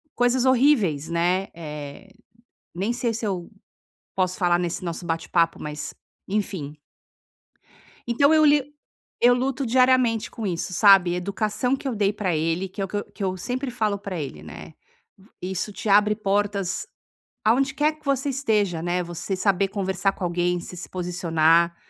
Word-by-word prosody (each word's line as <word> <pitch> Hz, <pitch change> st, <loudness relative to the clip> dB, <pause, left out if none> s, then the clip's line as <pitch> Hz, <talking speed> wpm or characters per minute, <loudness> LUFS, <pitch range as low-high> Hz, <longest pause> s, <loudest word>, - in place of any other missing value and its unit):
coisas 245 Hz, +1 st, +2 dB
horríveis", 240 Hz, -, +3 dB
né, 180 Hz, +3 st, +1 dB
eh, 150 Hz, +2 st, -8 dB, 0.7 s
nem 200 Hz, +7 st, -1 dB
sei 240 Hz, -1 st, -1 dB
se 225 Hz, +1 st, -4 dB
eu 180 Hz, -4 st, -3 dB, 0.7 s
posso 185 Hz, -1 st, 0 dB
falar 175 Hz, -2 st, +3 dB
nesse 175 Hz, +1 st, -3 dB
nosso 170 Hz, +1 st, -5 dB
bate-papo, 165 Hz, 0 st, 0 dB
mas, 150 Hz, 0 st, -5 dB, 0.3 s
enfim 190 Hz, -8 st, -3 dB, 1.3 s
Então 280 Hz, +5 st, +3 dB
eu 310 Hz, -1 st, +5 dB
li 290 Hz, -1 st, +5 dB, 0.6 s
eu 245 Hz, +1 st, +6 dB
luto 260 Hz, +1 st, -1 dB
diariamente 250 Hz, -2 st, +3 dB
com 225 Hz, -, -5 dB
isso, 180 Hz, 0 st, -3 dB
sabe? 195 Hz, -3 st, +6 dB
Educação 210 Hz, +7 st, -1 dB
que 270 Hz, -, -5 dB
eu 255 Hz, -, -2 dB
dei 205 Hz, 0 st, +2 dB
pra 185 Hz, -6 st, -1 dB
ele 165 Hz, +4 st, -1 dB
que 195 Hz, -, -9 dB
é -, -, +1 dB
o -, -, -5 dB
que 205 Hz, -, -4 dB
eu 205 Hz, -, -2 dB
que 200 Hz, -, -5 dB
eu 185 Hz, 0 st, -1 dB
sempre 250 Hz, +7 st, -3 dB
falo 215 Hz, -4 st, -1 dB
pra 190 Hz, -4 st, -5 dB
ele, 140 Hz, -3 st, -6 dB
né: -, -, -10 dB, 0.4 s
"V 195 Hz, +3 st, -21 dB
isso 190 Hz, +3 st, -3 dB
te 215 Hz, -, -6 dB
abre 210 Hz, +1 st, +5 dB
portas 200 Hz, -, -1 dB, 0.6 s
aonde 270 Hz, +5 st, +3 dB
quer 300 Hz, +2 st, +1 dB
que 300 Hz, -, -27 dB
você 275 Hz, 0 st, 0 dB
esteja, 210 Hz, -, 0 dB
né, 175 Hz, +1 st, 0 dB
você 175 Hz, +3 st, -4 dB
saber 195 Hz, 0 st, +2 dB
conversar 195 Hz, -1 st, 0 dB
com 190 Hz, -, -8 dB
alguém, 175 Hz, 0 st, 0 dB
você 180 Hz, -, -9 dB
se 180 Hz, -, -7 dB
posicionar, 170 Hz, -2 st, +2 dB
195 Hz, 165 wpm, -24 LUFS, 175-235 Hz, 1.3 s, eu